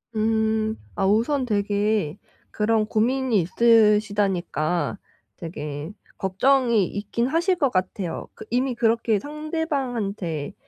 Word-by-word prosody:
음, 220 0 +1 0.2
아 195 - 0
우선 235 +7 +2
되게 205 -5 0 0.3
그런 215 0 +1
고민이 235 0 +1
있으시다니까 205 -5 +2 0.4
되게 150 -3 -6 0.3
걱정이 235 +2 +2
있긴 210 +4 -2
하실 340 +6 +1
것 280 -5 +2
같아요. 185 -2 -2
그 - - -11
이미 250 +2 0
그렇게 230 -2 +1
상대방한테 260 - -3
215 Hz, 230 characters per minute, -24 LUFS, 195-245 Hz, 0.4 s, 우선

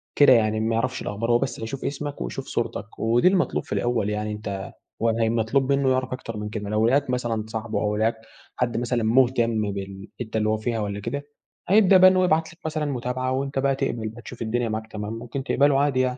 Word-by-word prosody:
كده 145 -3 +7
يعني 110 -2 +2
ما 115 +1 0
يعرفش 130 +3 -1
الأخبار 115 +3 -2
هو 120 - +4
بس - - -3
هيشوف 115 +4 -5
اسمك 145 +1 -4
ويشوف - - -4
صورتك 110 +3 -4
ودي 115 +8 +3
المطلوب 185 -1 +2
في - - -6
الأول 120 -4 0
يعني 105 0 -2
أنتَ 100 -2 -5 0.3
وهي 115 0 +1
مطلوب 120 +4 +1
منه 140 -1 +2
يعرف 130 0 0
أكتر 115 -4 -6
من 105 0 -4
كده 105 -1 -5
لو 110 +2 +2
لقاك 140 +1 +2
مثلًا 120 -3 -1
صاحبه 110 0 -3
أو 105 0 0
لقاك 110 +2 +1 0.4
حد 120 -2 -1
مثلًا 120 -1 0
مهتم 115 -3 +2
بالحتّة 100 +4 -6
اللي 110 0 +1
هو 110 - +1
فيها 115 +1 -2
والّا 100 -1 -3
كده 140 +7 -4 0.4
هيبدأ 195 -2 +6
بقى 185 0 +8
إن 185 - +1
هو 185 - +3
يبعت 160 -1 +1
لك 170 - -24
مثلًا 155 -1 -1
متابعة 130 -1 -2
وأنتَ 135 +1 -1
بقى 135 0 +2
تقبل 120 -5 -2
بقى 115 +2 -11
تشوف 120 0 -10
الدنيا 115 +1 -1
معاك 110 0 -3
تمام 105 +1 -5
ممكن 120 +4 -5
تقبله 140 0 +3
عادي 140 -3 +2
يعني. 125 0 +1
120 Hz, 220 wpm, -24 LUFS, 110-135 Hz, 0.4 s, بقى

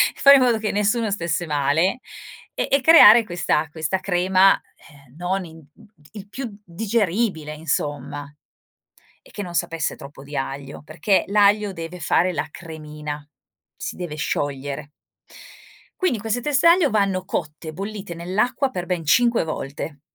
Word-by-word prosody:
fare 280 0 +7
in - - +2
modo 235 -3 +2
che 215 -1 -2
nessuno 210 +2 0
stesse 170 -3 -2
male 150 - +1 0.5
e - - -2
e 275 - +4
creare 240 -7 +8
questa 175 -4 0
questa 160 +4 -2
crema, 185 +1 +3 0.3
ehm, 140 -3 -20
non 180 +2 -2
in 160 -1 -13
mhmm, 150 +3 -19
t 150 - -20
il 205 -2 -10
più 235 -2 -6
digeribile 195 -4 -1
insomma 145 -2 -3 0.9
e - - -21
che 205 - -6
non 175 -2 -8
sapesse 165 -2 -1
troppo 140 -2 -12
di 145 +1 -7
aglio, 135 +1 -5
perché 180 +6 0
l'aglio 205 0 +3
deve 165 +1 -7
fare 175 +3 +2
la 150 - -2
cremina, 150 -2 -8 0.5
si - - -6
deve 175 -4 -5
sciogliere. 145 -1 -3 1.1
Quindi 365 - +1
queste 225 +3 -2
teste 295 +4 +2
aglio 335 -5 +5
vanno 195 -3 0
cotte, 155 0 -5
bollite 200 +1 -6
nell'acqua, 215 +11 -1
per 180 -8 -5
ben 175 -2 -2
5 235 - +3
volte. 145 -1 -6
180 Hz, 150 wpm, -22 LUFS, 150-210 Hz, 1.1 s, creare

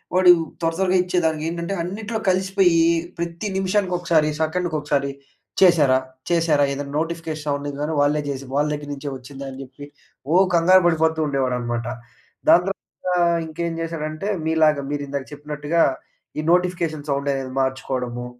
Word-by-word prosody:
వాడు 185 -1 +7 0.3
త్వర 165 0 +1
త్వరగా 190 -1 +3
ఇచ్చేదానికి, 165 -4 0
ఏంటంటే 170 +2 -3
అన్నిట్లో 215 +5 -4
కలిసిపోయి 190 -1 +3 0.4
ప్రతి 170 +4 -3
నిమిషానికి, 190 0 0
ఒకసారి 165 -3 +2
సెకండ్‌కి 165 +1 -1
ఒకసారి 140 -1 0 0.5
"చేశారా? 150 -8 +5 0.3
చేశారా?" 165 -4 +3
ఏదైనా 140 +1 -5
నోటిఫికేషన్ 165 -2 -4
సౌండ్ 145 0 -2
కానీ, 150 +2 -1
వాళ్లే 145 +1 +2
చేసి 135 -1 -5
వాళ్ల 145 +1 +2
దగ్గర 145 0 -6
నుంచే 145 +1 -5
వచ్చిందా 135 +2 -9
అని 130 - -10
చెప్పి, 135 +2 -12 0.5
ఓహ్! 190 +2 +6
కంగారు 185 +2 +6
పడిపోతూ 160 -1 +2
ఉండేవాడన్నమాట. 125 -4 -1 0.6
దాని 175 - +7
తర్వాత 195 -1 -7 0.4
ఇంకేం 165 +1 -3
చేశాడంటే, 160 +2 -4 0.2
మీలాగా 155 -3 +3
మీరు 145 -1 -2
ఇందాక 140 -1 -4
చెప్పినట్టుగా, 150 +2 -1 0.6
ఈ - - +1
నోటిఫికేషన్ 170 -4 0
సౌండ్ 140 +1 -1
అనేది 135 -1 -4
మార్చుకోవడము. 130 -2 -3
155 Hz, 140 wpm, -22 LUFS, 140-175 Hz, 0.6 s, వాడు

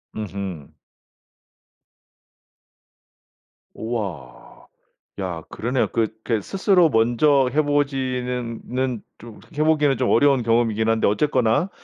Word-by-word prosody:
음음. 100 -7 -6 3.0
오와. 100 - -6 0.5
야 90 -4 -4
그러네요. 125 +3 -1
그게 110 0 -1
스스로 185 - +3
먼저 125 +4 +3
해 155 - +3
보지는 130 -5 -2
는 125 -3 -2 0.2
좀 115 -1 -12
그 - - -19
해 - - +4
보기는 150 -3 +2
좀 130 - 0
어려운 140 -4 +4
경험이긴 115 -1 +1
한데 115 0 +2
어쨌거나 130 - +1
120 Hz, 210 characters per minute, -22 LUFS, 110-135 Hz, 3.0 s, 해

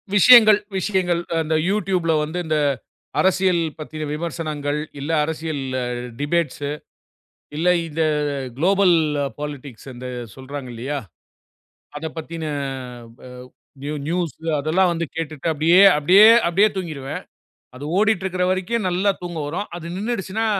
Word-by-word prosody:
விஷயங்கள் 215 0 +8 0.2
விஷயங்கள். 185 -3 0 0.2
அந்த 160 0 -1
YouTubeல 185 -5 0
வந்து 155 +4 -5
இந்த 155 -1 0 0.6
அரசியல் 185 -2 +3 0.2
பத்தின 155 0 -6
விமர்சனங்கள் 150 -2 -3 0.2
இல்ல 145 +4 -3
அரசியல் 160 -1 -3 0.6
டிபேட்ஸ்ஸு 145 -1 -1 0.9
இல்ல 165 +4 +1 0.2
இந்த 160 +1 -2 0.5
குலோபல் 185 +4 +4 0.4
பாலிட்டிக்ஸ் 145 -4 -7
அந்த 125 +1 -8 0.3
சொல்றாங்க 135 0 -8
இல்லையா? 135 +5 -3 1.0
அத 155 - -6
பத்தின 160 +1 -6 0.7
வ - - -28 0.6
ந்யூ 145 +1 -3
ந்யூஸ் 170 -1 -1 0.2
அதெல்லாம் 175 +5 +2
வந்து 170 0 -2
கேட்டுட்டு 160 -2 -4
அப்படியே 165 +5 +5 0.2
அப்படியே 185 +8 +7 0.2
அப்படியே 195 +5 +4
தூங்கிருவேன். 155 -7 -5 0.6
அது 135 - -8
ஓடிட்டு 210 -3 +2
இருக்கிற 185 -1 -1
வரைக்கும் 190 +3 -1
நல்லா 185 +3 +1
தூக்கம் 170 -4 -5
வரும். 185 +7 -4
அது 170 - -9
நின்னுடுச்சுனா 220 0 -2
165 Hz, 115 wpm, -21 LUFS, 150-190 Hz, 1.0 s, விஷயங்கள்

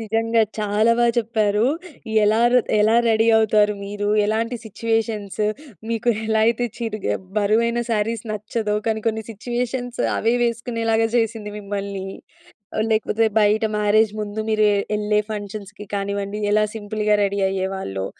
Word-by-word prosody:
నిజంగా 225 +1 +1 0.2
చాలా 210 +2 +2
బా 240 - +4
చెప్పారు. 215 -2 +1 0.6
ఎలా 215 +2 +3
ర - - +5 0.2
ఎలా 220 +2 +4
రెడీ 225 0 +3
అవుతారు 210 -1 +3
మీరు, 205 +1 -3 0.2
ఎలాంటి 225 +3 -1
సిట్యుయేషన్స్ 220 -1 -2 0.5
మీకు 230 +1 -1 0.2
ఎలా 220 0 +2
అయితే 235 +1 +1
చిరుగ 225 -3 -4 0.3
బరువైన 230 +3 +2
సారీస్ 225 0 0
నచ్చదో, 215 0 -2
కానీ 220 -1 0
కొన్ని 220 0 0
సిట్యుయేషన్స్ 245 +3 -3 0.2
అవే 230 +2 +2
వేసుకునేలాగా 230 -1 0
చేసింది 225 -2 -1
మిమ్మల్ని. 200 -1 -4 0.7
ఆహ్, 215 - +1
లేకపోతే 220 0 +1 0.2
బయట 210 +1 +3
మ్యారేజ్ 210 +1 +3
ముందు 210 +1 -4
మీరె 215 -1 +3 0.3
ఎళ్ళే 210 0 +1
ఫంక్షన్స్‌కి 210 0 -7
కానివ్వండి, 200 +1 -3
ఎలా 215 0 +4
సింపుల్‌గా 210 0 0
రెడీ 200 0 -1
అయ్యేవాళ్ళో. 190 - -3
215 Hz, 130 wpm, -22 LUFS, 205-225 Hz, 0.7 s, ర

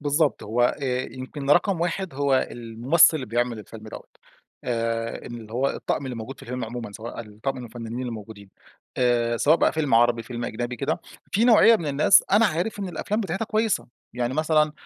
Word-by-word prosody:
بالضبط، 145 +1 +1
هو 115 +3 0 0.2
آآ، 130 -1 0
يمكن 135 +2 -5
رقم 180 +3 +3
1 175 -1 -2
هو 140 -1 +2
الممثّل 120 +8 +3
اللي 130 -4 -5
بيعمل 120 +1 -1
الفيلم 110 +1 -11
دوَّة، - - -9 0.6
آآ، 115 -1 -2
إن 120 - -7
اللي 110 -1 -12
هو 130 +4 +1
الطقم - - -3
اللي 125 - -5
موجود 115 +4 -7
في - - -15
الفيلم 125 0 -4
عمومًا، 115 -2 -6
سواء 115 +3 -7
الطقم 110 +5 -5
من 125 - -7
الفنّانين 120 +2 -6
الموجودين 105 -3 -8 0.5
آآ، 120 -2 +2
سواء 150 +7 +4
بقى - - +2
فيلم 155 -5 0
عربي 120 0 +4
فيلم 120 0 -6
أجنبي 120 +2 -4
كده، - - -2 0.3
في 220 - +3
نوعية 230 -1 +7
من 170 - -5
الناس 145 +6 +5
أنا 215 +3 +6
عارف 180 +4 -2
إن 195 - -3
الأفلام 205 +5 -2
بتاعتها 195 +1 -2
كويّسة، 220 -1 0 0.3
يعني 125 +1 -1
مثلًا 155 -1 +2
125 Hz, 190 wpm, -24 LUFS, 115-155 Hz, 0.6 s, نوعية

